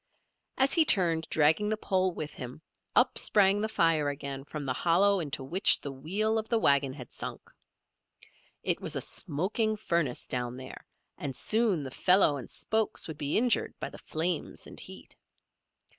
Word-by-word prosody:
As 265 +1 +3
he 330 - +5
turned, 170 - +2
dragging 160 +7 +3
the 215 - 0
pole 185 -3 0
with 155 -3 -6
him, 125 +5 -9 0.3
up - - +4
sprang 200 0 +4
the 220 - -1
fire 165 -7 +2
again 140 -1 -5
from 145 0 -6
the 130 - -1
hollow 190 +8 +3
into 145 -4 -4
which 175 +9 +3
the 140 - -6
wheel 200 +11 -1
of 220 - -6
the 230 - +2
wagon 140 -8 +3
had 130 -4 -10
sunk. - - -8 1.1
It - - 0
was - - -2
a - - 0
smoking 215 +8 -1
furnace 170 - -1
down 125 0 -2
there, 130 0 -10 0.3
and 135 -3 -4
soon 215 - +1
the 130 - -6
felloe 180 -2 +4
and 130 - -8
spokes 220 0 -1
would 155 -3 -8
be 145 -1 +1
injured 240 +1 +1
by - - -5
the - - -11
flames 165 +1 -2
and - - -7
heat. - - -10
165 Hz, 175 wpm, -29 LUFS, 140-205 Hz, 1.1 s, he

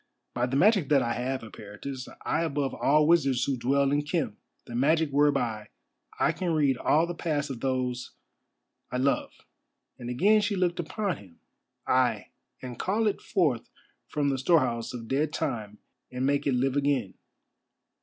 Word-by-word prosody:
"By 120 +1 0
the 130 - -2
magic 195 -3 +4
that 140 -3 +4
I 120 - -1
have, 130 +2 -2
Eperitus, 110 +5 -8 0.2
I 160 - +1
above 145 -4 -1
all 150 +2 +3
wizards 140 -6 +3
who 140 - 0
dwell 135 +3 +1
in 145 +1 +2
Khem, 150 - -2 0.3
the - - -10
magic 155 +5 +2
whereby 125 -7 +1 0.5
I - - +3
can 175 -3 -2
read 145 -4 +3
all 155 +6 +3
the 175 - -4
past 150 -4 -2
of 125 - -6
those—I 125 -1 -6
love," 135 +2 +1 0.7
and 120 -1 -6
again 205 - +4
she 205 0 0
looked 180 -1 0
upon 185 0 -2
him; 90 -5 -17 0.5
"ay, 120 -5 +1 0.3
and 125 -2 -7
call 215 +4 0
it 210 - 0
forth 155 - 0 0.4
from 145 -1 0
the 135 -1 -1
storehouse 130 -6 +2
of 115 -2 -7
dead 145 +4 0
time 110 -11 -3 0.3
and 125 +1 -2
make 140 +1 +1
it 135 - +2
live 130 +2 +1
again. 140 -8 0
140 Hz, 165 wpm, -28 LUFS, 125-160 Hz, 0.7 s, magic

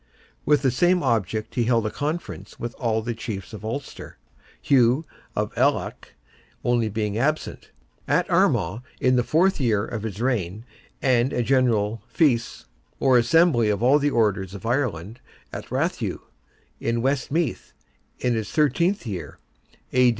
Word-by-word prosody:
With 150 -1 +4
the 130 - +3
same 180 +4 +2
object 110 -4 -1
he 120 - 0
held 115 -2 +2
a 105 - -1
conference 155 +4 -5
with 120 0 -4
all 110 -3 0
the 120 +1 -2
chiefs 110 -2 -6
of 110 - -8
Ulster, 120 +5 -6 0.4
Hugh 130 +3 +3 0.3
of - - -2
Aileach - - -1 0.5
only 120 -2 +1
being 105 0 -2
absent, 155 +5 -2 0.4
at - - +2
Armagh, 95 +9 +2 0.2
in 125 0 +3
the 125 - +3
fourth 180 +8 +2
year 110 -4 +1
of 115 -2 -5
his 110 -2 -5
reign, 110 -4 -1 0.4
and 130 -1 +3
a 120 - 0
General 115 -5 +1
Feis, 120 -5 +1 0.3
or 130 -2 +5
Assembly 120 -2 +4
of 105 +1 0
all 135 +4 +5
the 145 0 +2
Orders 100 -6 0
of 100 - -9
Ireland, 115 - -2 0.3
at - - -7
Rathugh, - - -2 0.6
in 115 0 -1
West 135 -1 0
Meath, 160 -4 -1 0.5
in 125 - 0
his 110 -3 -2
thirteenth 170 +4 +1
year 95 -7 -6 0.6
(A. 125 -1 +5
120 Hz, 150 wpm, -24 LUFS, 110-135 Hz, 0.6 s, or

